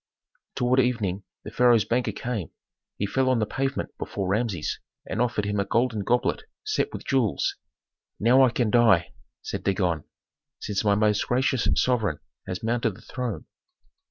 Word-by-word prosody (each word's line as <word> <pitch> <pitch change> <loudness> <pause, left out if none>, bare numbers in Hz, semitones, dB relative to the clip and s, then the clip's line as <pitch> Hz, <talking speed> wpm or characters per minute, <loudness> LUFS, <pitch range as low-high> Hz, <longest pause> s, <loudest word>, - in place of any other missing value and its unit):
Toward 125 +1 +2
evening 105 -7 0 0.2
the 110 - -8
pharaoh's 120 -2 +4
banker 120 +3 0
came. 115 -8 -4 0.5
He 100 - -1
fell 130 +6 +1
on 130 - +3
the 110 - +1
pavement 135 +4 -3
before 100 -2 -3
Rameses 100 -5 -1 0.3
and 110 - -2
offered 115 -4 0
him 105 0 -1
a - - +2
golden 115 -1 0
goblet 120 +4 +1 0.2
set 430 0 0
with - - -7
jewels. 130 -7 +1 0.6
"Now 120 +5 +5
I 130 - +5
can 120 -2 0
die!" 110 -7 +4 0.3
said - - -4
Dagon, 90 -5 0 0.5
"since 105 0 -2
my 100 -1 +3
most 105 0 +2
gracious 130 0 +1
sovereign 110 - +1 0.3
has 95 +1 -4
mounted 115 -2 0
the - - -15
throne." 125 -5 -5
115 Hz, 155 wpm, -26 LUFS, 100-125 Hz, 0.6 s, Now